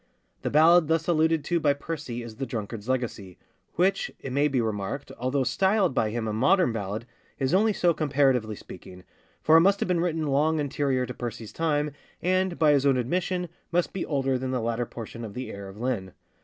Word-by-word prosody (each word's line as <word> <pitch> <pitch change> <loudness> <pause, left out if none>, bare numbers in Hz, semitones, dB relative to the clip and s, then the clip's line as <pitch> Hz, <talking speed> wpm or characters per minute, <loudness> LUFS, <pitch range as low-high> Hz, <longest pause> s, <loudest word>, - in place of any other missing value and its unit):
The - - -2
ballad 160 +2 +6
thus 160 0 +1
alluded 160 -2 +2
to 175 -1 0
by 145 -3 +3
Percy 140 -5 -5
is 115 -2 -10
The 135 0 -3
Drunkard's 110 0 -5
Legacy, 115 -8 -3 0.4
which, 190 +3 +1
it 135 - -6
may 145 +2 +3
be 135 -3 0
remarked, 110 +3 -3
although 130 +2 0
styled 190 - +2
by 110 - +1
him 115 0 -3
a 110 - -2
modern 140 - +3
ballad, 105 +1 -4 0.3
is 135 +2 0
only 215 +4 +4
so 175 -4 +2
comparatively 135 -8 +1
speaking; 90 -1 -12 0.4
for 160 +1 +6
it - - +7
must 195 +3 +4
have - - 0
been 180 -2 +1
written 165 -2 0
long 150 +3 +2
anterior 140 -3 0
to 125 - -6
Percy's 115 -2 -6
time, 150 -2 0 0.3
and, 185 0 +1
by 155 -2 +4
his 140 -2 +3
own 135 -2 +3
admission, 180 +7 -1 0.2
must 175 0 0
be 190 - -2
older 135 -3 0
than 130 0 -3
the 130 -1 -1
latter 115 +1 -1
portion 115 0 -8
of 105 -3 -7
the 130 0 -5
Heir 100 0 -8
of 95 +1 -11
Linne. 115 -7 -2
135 Hz, 205 wpm, -26 LUFS, 115-165 Hz, 0.4 s, it